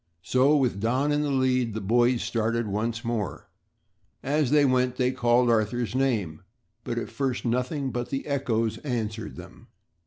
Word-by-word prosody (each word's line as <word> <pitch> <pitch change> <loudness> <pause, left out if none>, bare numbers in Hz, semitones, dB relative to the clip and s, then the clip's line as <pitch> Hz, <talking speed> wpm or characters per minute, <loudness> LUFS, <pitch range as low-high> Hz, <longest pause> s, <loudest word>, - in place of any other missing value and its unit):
So, 130 - +3
with 125 -8 0
Don 130 +7 +1
in 145 0 +1
the 150 - -1
lead 130 -4 +1
the - - -1
boys 120 +4 +2
started 115 +1 -1
once 110 +3 -2
more. 110 -8 -3 0.8
As 145 0 +1
they 145 0 +4
went 125 -1 +2
they 125 0 +1
called 120 -1 +2
Arthur's 115 -1 +1
name, 115 -12 0 0.4
but - - -4
at - - -4
first 130 -3 -2
nothing 125 +3 -1
but 120 0 -3
the 135 - -3
echoes 115 -6 -1
answered 110 -6 -4
them. - - -12
120 Hz, 160 wpm, -26 LUFS, 115-130 Hz, 0.8 s, they